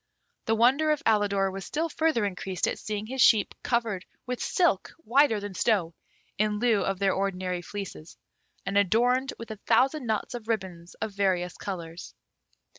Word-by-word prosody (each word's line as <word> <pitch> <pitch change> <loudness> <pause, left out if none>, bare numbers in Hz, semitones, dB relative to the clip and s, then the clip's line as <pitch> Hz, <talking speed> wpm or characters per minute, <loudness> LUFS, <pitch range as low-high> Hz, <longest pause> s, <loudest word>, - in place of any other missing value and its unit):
The 225 - +2
wonder 265 +7 +4
of 305 +1 +1
Alidor 200 -3 +2
was 195 0 -6
still 320 - -2
further 315 -8 +1
increased 190 -1 -2
at - - -2
seeing 210 0 -4
his 260 +3 -2
sheep 215 -3 +5
covered 230 -6 -1 0.2
with 250 -1 -4
silk 340 - +1
whiter 250 -1 +4
than 205 -1 -6
snow, 185 -5 +1 0.5
in 210 0 +1
lieu 220 -2 +2
of 195 -1 -1
their 195 0 +2
ordinary 185 -2 -2
fleeces, 180 -5 -8 0.5
and 195 +1 +2
adorned 245 +7 +2
with 230 -1 -8
a 215 - -6
thousand 265 0 +3
knots 220 +1 -1
of 235 -3 -7
ribbons 185 -6 -4
of 220 - -4
various 185 -3 0
colours. 170 -3 -7
210 Hz, 165 wpm, -27 LUFS, 190-240 Hz, 0.5 s, sheep